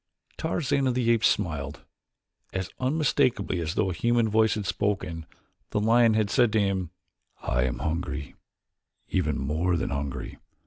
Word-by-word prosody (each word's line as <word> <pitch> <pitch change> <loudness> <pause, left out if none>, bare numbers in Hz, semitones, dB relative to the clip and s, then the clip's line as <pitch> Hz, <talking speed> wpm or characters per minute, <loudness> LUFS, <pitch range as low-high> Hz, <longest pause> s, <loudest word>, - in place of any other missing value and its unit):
Tarzan 140 -4 0
of 125 - +1
the 120 -2 +2
Apes 115 -2 +4
smiled. 75 -7 -2 0.7
As 95 -1 -3
unmistakably 130 - +1
as 80 -1 -3
though 95 - +1
a - - -3
human 120 +5 +2
voice 110 +1 +3
had 105 -2 -3
spoken, 95 -6 -2 0.4
the - - 0
lion 115 +1 +4
had 105 -2 +1
said 120 -3 +4
to 110 - +4
him 95 -4 0 0.5
"I 65 +1 +1
am - - -2
hungry, 75 -3 -3 0.8
even 75 -6 0
more 80 +6 0
than 80 - -2
hungry. 70 -1 -4
100 Hz, 150 wpm, -27 LUFS, 80-115 Hz, 0.8 s, Apes